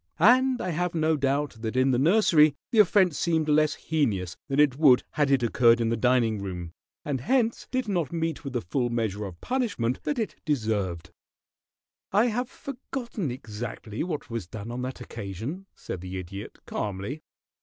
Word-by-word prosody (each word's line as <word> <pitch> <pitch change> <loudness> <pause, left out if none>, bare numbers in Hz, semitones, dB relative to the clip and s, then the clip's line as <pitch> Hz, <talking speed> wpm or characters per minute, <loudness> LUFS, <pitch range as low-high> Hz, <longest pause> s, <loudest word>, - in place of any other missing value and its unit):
And 255 +7 +5
I 185 - -2
have 175 +2 -1
no 160 0 +2
doubt 140 -2 0
that 110 +1 -4
in 130 +1 +4
the 125 - +2
nursery 155 -2 +5 0.2
the 225 - +3
offence 185 -5 +4
seemed 160 -2 +1
less 155 0 +3
heinous 105 - -1
than 140 0 -1
it 145 -4 +5
would 135 -4 +5
had 145 -2 +1
it 135 -3 +3
occurred 115 0 +4
in 115 -1 +1
the 115 - +1
dining 115 -2 +2
room, 90 -3 -6 0.3
and 140 -4 -2
hence 235 - +1
did 255 -2 -1
not 175 -8 -1
meet 165 -2 -2
with 140 -3 -6
the 120 - -1
full 120 +8 -1
measure 110 -3 -2
of 90 -3 -9
punishment 210 - -1
that 295 - -2
it 225 -3 -3
deserved." 110 - -1 1.0
"I 210 +4 +4
have 245 +3 -2
forgotten 240 - -5
exactly 110 -2 -6
what 160 -4 -4
was 115 -7 -4
done 110 +3 -7
on 125 +1 -4
that 130 0 -5
occasion," 115 - -6
said 90 - -6
the 95 +1 -6
Idiot, 95 +2 -7
calmly. 105 +9 -4
135 Hz, 175 wpm, -27 LUFS, 110-170 Hz, 1.0 s, And